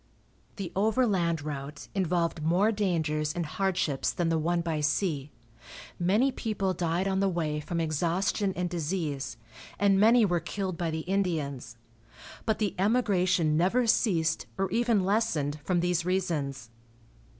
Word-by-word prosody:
The 190 -4 -5
overland 195 - +1
route 145 -1 -6
involved 175 -4 0
more 180 +8 +3
dangers 160 -7 0
and 175 -1 -1
hardships 175 -5 0
than 175 -2 -1
the 165 -1 +1
one 170 +2 +1
by 165 -3 -2
sea. 150 -2 0 0.7
Many 210 +10 +3
people 200 -6 -2
died 175 +2 -1
on 190 0 0
the 195 0 +2
way 155 -4 -1
from 170 +3 -3
exhaustion 175 +5 0
and 180 0 -1
disease, 160 -4 -3 0.4
and 200 -1 +3
many 225 +2 +6
were 175 -3 +1
killed 185 +2 -4
by 165 0 -2
the 160 0 -3
Indians, 155 -10 -2 0.7
but 220 - +2
the 210 -4 -1
emigration 185 -7 +2
never 190 +10 +2
ceased, 170 -8 +1
or 190 -1 -1
even 230 -5 +2
lessened, 160 -8 0
from 175 +1 +1
these 175 -1 +1
reasons. 150 -9 -2
175 Hz, 140 wpm, -28 LUFS, 160-195 Hz, 0.7 s, many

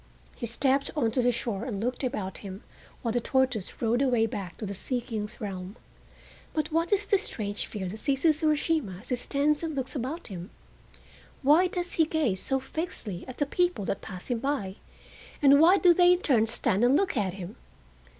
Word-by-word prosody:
He 235 - -4
stepped 270 +4 +1
on 230 -7 +1
to 250 - +1
the 245 0 +3
shore 230 -3 -3
and 230 -6 -3
looked 245 +5 -2
about 210 -8 -3
him 195 0 -8 0.4
while 230 - 0
the 240 +1 0
tortoise 255 -5 0
rode 235 +3 +2
away 245 -5 +3
back 195 -5 -5
to 215 - -5
the 200 - -4
Sea 245 +6 -2
King's 225 -2 -5
realm. 195 -2 -5 0.8
But 310 0 -1
what 330 +2 +1
is 410 0 +2
the 400 -1 +3
strange 205 - -3
fear 195 -3 -4
that 210 +5 -6
seizes 295 +4 +2
Urashima 300 - 0
as 240 - -14
he 250 - +2
stands 285 +4 0
and 320 -3 -3
looks 265 0 -3
about 285 +7 -4
him? 180 -1 -7 0.9
Why 310 +7 +6
does 355 -1 -3
he 325 - +3
gaze 285 - 0
so 270 -1 0
fixedly 260 - -5
at 255 - -8
the 290 - +1
people 350 - 0
that - - -2
pass 185 -1 -8
him 240 - 0
by, 225 -8 -2 0.6
and 280 0 +6
why 350 +5 +7
do 355 -2 +6
they 355 +1 +6
in 360 - -1
turn 230 -9 +3
stand 225 -2 0
and 250 +3 +5
look 390 -5 0
at 195 -6 0
him? 195 +1 -8
250 Hz, 200 wpm, -28 LUFS, 210-300 Hz, 0.9 s, why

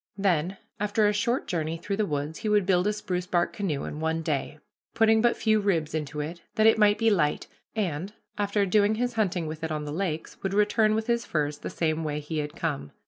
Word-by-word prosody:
Then, 185 -2 +1 0.2
after 210 +1 +2
a 205 - +2
short 235 +5 0
journey 165 -1 -2
through 195 +4 -3
the 215 -1 +1
woods, 150 +1 -3
he 215 - -2
would 210 -2 +3
build 180 0 +3
a 210 - +2
spruce 180 -3 -3
bark 175 -1 +1
canoe 160 -9 -2
in 150 - -5
one 160 +1 -1
day, 150 -1 -2 0.4
putting 220 0 +4
but 240 0 +3
few 215 -1 +3
ribs 170 -7 0
into 150 -1 -3
it, 165 +3 -6
that 215 -1 +3
it 225 0 +6
might 210 -1 +5
be 225 -1 +3
light, 160 -7 +1 0.3
and, 185 -3 -2 0.2
after 205 0 +1
doing 205 +2 +3
his 245 +2 -1
hunting 190 -6 0
with 155 +1 -6
it 160 - -2
on 150 -1 -2
the 145 - -5
lakes, 165 -3 -3
would 195 0 -2
return 215 +1 +3
with 220 0 -1
his 235 0 +1
furs 150 -5 -1
the - - -5
same 160 -1 -1
way 150 -1 -2
he 150 +1 -4
had 150 +1 -4
come. 150 - -3
180 Hz, 230 wpm, -27 LUFS, 155-210 Hz, 0.4 s, it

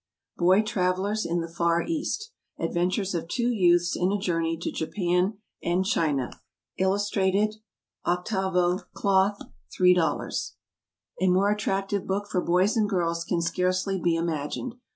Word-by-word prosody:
Boy 185 +4 +4
Travellers 195 +1 0
in 170 +1 0
the 165 - -4
Far 170 0 +1
East. 335 +8 -3 0.3
ADVENTURES 185 +3 -1
OF 165 -1 -3
TWO 240 +7 0
YOUTHS 175 -5 +3
IN 180 +2 +1
A 205 - +1
JOURNEY 165 -4 -1
TO 170 - -4
JAPAN 180 +3 0 0.2
AND 180 +2 0
CHINA. 150 - 0 0.4
Illustrated, 200 +2 +1 0.5
8vo, 180 0 +1
Cloth, 195 +1 +2 0.4
$3.00. 180 -4 +2 0.7
A 190 - +3
more 190 +3 +3
attractive 195 -1 -1
book 200 +2 -1
for 180 - +1
boys 185 +6 +2
and 215 -2 +2
girls 170 -3 0
can 170 0 -1
scarcely 185 +2 0
be 170 -1 +2
imagined. 165 - -2
185 Hz, 130 wpm, -26 LUFS, 175-200 Hz, 0.7 s, Boy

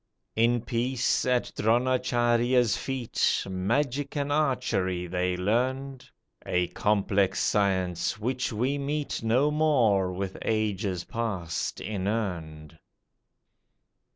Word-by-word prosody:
In 115 +1 +3
peace, 125 +2 0
at 125 -1 +1
Dronacharjya's 120 0 +2
feet, 130 -4 -1
Magic 135 +10 -1
and 145 0 -1
archery 120 -11 0
they 90 +1 -1
learned, 130 +7 -1 0.3
A 90 -1 0
complex 100 0 +1
science, 95 -3 +1
which 125 +4 -2
we 130 +6 -1
meet 145 +1 -2
No 125 +6 +2
more, 120 -12 +3
with 95 +1 -4
ages 105 -4 -1
past 100 -9 -3
inurned. 90 -7 -4
115 Hz, 95 wpm, -27 LUFS, 95-130 Hz, 0.3 s, In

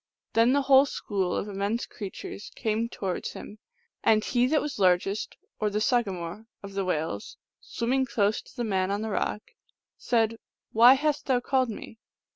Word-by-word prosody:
Then 230 +3 +4
the 285 0 +2
whole 270 +1 +6
school 195 -8 -2
of - - -2
immense 205 +3 -2
creatures 200 0 -8
came 225 0 -1
to - - -14
wards 185 -2 -2
him; 210 - -10 0.4
and 215 -1 +4
he 245 0 +2
that 305 +3 +3
was 295 -7 -4
largest, 190 +2 +1 0.2
or 215 - +1
the 210 +1 -1
sagamore 210 -4 -1 0.2
of 200 0 -8
the 195 0 -1
whales, 155 - -3 0.2
swimming 260 +3 -1
close 210 -3 +1
to - - -19
the 240 - -2
man 190 -4 0
on 200 +2 -1
the 220 - -3
rock, 210 +1 -2 0.5
said, 230 -2 +1 0.2
" - - -65
Why 240 +4 +8
hast 295 +1 -1
thou 255 -2 +3
called 260 0 +1
me 220 +1 -8
220 Hz, 180 wpm, -27 LUFS, 200-245 Hz, 0.5 s, Why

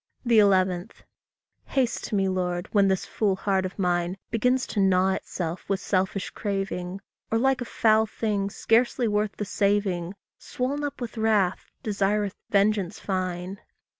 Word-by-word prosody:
11. 190 -4 +4 0.8
Haste 260 -4 0
to - - -3
me, 195 -1 +2
Lord, 180 -1 -1
when 200 -2 +4
this 190 -1 0
fool 205 -3 0
heart 190 -1 0
of 185 - -13
mine 175 -1 0
Begins 250 +3 +2
to 210 - -3
gnaw 190 -1 +4
itself 175 -2 -4
with 195 -1 +1
selfish 190 0 -1
craving; 195 -2 -3 0.3
Or, 225 - +1
like 265 +1 +2
a - - -2
foul 220 -1 +3
thing 205 -3 -1
scarcely 235 +3 +2
worth 210 0 0
the 210 - -2
saving, 200 -3 0 0.2
Swoln 275 +4 -3
up 285 -2 -4
with 235 -1 -5
wrath, 210 -5 +1
desireth 205 -1 0 0.2
vengeance 200 -2 +1
fine. 185 0 -3
200 Hz, 145 wpm, -26 LUFS, 185-220 Hz, 0.8 s, 11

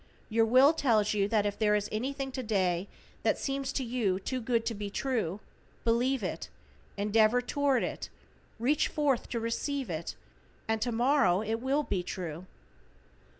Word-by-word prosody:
Your 225 0 +3
Will 260 +6 +6
tells 225 -10 +2
you 200 -1 +1
that 210 -1 +1
if 205 -1 -2
there 210 -1 +3
is 210 0 0
anything 270 +4 -3
to 260 - -4
day 190 -5 0 0.3
that - - +2
seems 275 0 -2
to 270 - -1
you 230 -6 0
too 255 +6 -3
good 230 -1 0
to 230 - -1
be 205 -1 -5
true, 215 -5 -2 0.4
believe 245 +3 +1
it, - - -4 0.5
endeavor 215 +3 +3
toward 275 +1 +1
it, - - -4 0.5
reach 270 +7 +2
forth 285 -5 0
to 235 - -2
receive 245 +1 -2
it, 160 0 -4 0.5
and 220 0 0
tomorrow 240 -4 +3
it 220 +1 -2
will 275 +3 +1
be 190 -9 -1
true. 175 -1 -6
230 Hz, 160 wpm, -30 LUFS, 205-265 Hz, 0.5 s, Will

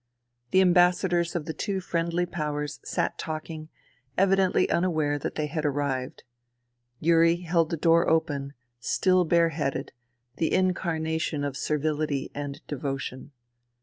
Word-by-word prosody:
The 190 - +4
Ambassadors 180 -1 +3
of 165 -4 -2
the 160 - -4
two 195 +1 -2
friendly 170 -1 -1
powers 150 -5 -3
sat - - -2
talking, 155 0 -5 0.5
evidently 195 -1 +3
unaware 155 -5 +1
that - - -4
they 155 - -1
had 155 +1 -3
arrived. 140 -3 -2 0.8
Yuri 165 +1 +4
held 165 -2 +1
the 165 - -2
door 165 +2 +4
open, 145 -4 0 0.3
still 185 +8 +2
bare 170 0 +4
headed, 140 -3 -3 0.5
the 160 - 0
incarnation 160 -5 0
of 140 -2 -2
servility 150 -1 -1
and 140 -1 -6
devotion. 135 -1 -4
160 Hz, 125 wpm, -27 LUFS, 145-175 Hz, 0.8 s, The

